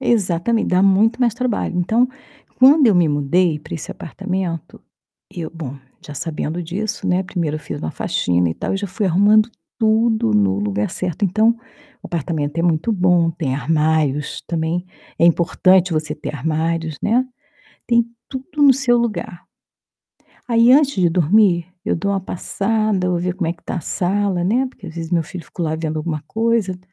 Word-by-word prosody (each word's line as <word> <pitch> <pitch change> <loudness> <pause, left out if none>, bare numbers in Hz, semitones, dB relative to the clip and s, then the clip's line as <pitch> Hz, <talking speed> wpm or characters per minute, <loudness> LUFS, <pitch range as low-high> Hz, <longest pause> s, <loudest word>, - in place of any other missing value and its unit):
Exatamente, 220 -2 +1
dá 185 +1 +2
muito 205 +5 +3
mais 235 -3 +3
trabalho. 245 -6 -2
Então, 225 +8 +2 0.5
quando 270 +1 +6
eu 205 - +4
me 175 -2 +4
mudei 150 +3 +1
para 150 - -10
esse 160 - -5
apartamento, 180 -1 -5 0.5
eu 165 -2 -5
bom, 150 -5 -7 0.3
já 150 - -8
sabendo 160 +2 -3
disso, 190 +6 -4
né, 180 +1 +1
1º 170 -5 -2
eu - - -4
fiz - - -7
uma 80 - -4
faxina 90 -1 0
e - - -2
tal - - -3
e - - 0
já 200 +1 -4
fui 195 +3 -2
arrumando 210 +5 +4 0.3
tudo 220 - +2
no 100 -2 +2
lugar 105 0 -1
certo. 180 +1 -3
Então, 215 +4 +3 0.5
o - - -7
apartamento 155 -2 -3
é - - +2
muito 170 +4 +1
bom; 180 -4 +3
tem 135 -5 -2
armários 150 0 0
também. 170 +2 -2 0.3
É 170 - +4
importante 180 +2 +3
você 155 -1 -1
ter 150 0 -6
armários, 160 +2 -2
né. 245 +4 +2 0.6
Tem 235 -1 +3 0.2
tudo 285 +3 -4
no 280 -2 +8
seu 255 -2 +2
lugar. 195 -6 -3 1.0
Aí 230 +1 +5
antes 280 0 +4
de 175 - +5
dormir, 175 +1 +3 0.2
eu - - 0
dou 200 +4 -1
uma 195 - 0
passada, 200 +1 -1
vou 175 - 0
ver 180 +1 -2
como 175 -4 -2
é - - 0
que 170 - -22
está - - -4
a - - -2
sala, 190 +2 -1
né, 245 +8 +2
porque 225 -6 -12
às 160 - -8
vezes 165 -1 -6
meu 170 -2 +2
filho 165 +1 -9
ficou 170 - -5
lá 155 -1 -1
vendo 160 -1 -3
alguma 155 -1 -3
coisa. 225 -4 0
180 Hz, 180 wpm, -19 LUFS, 160-215 Hz, 1.0 s, no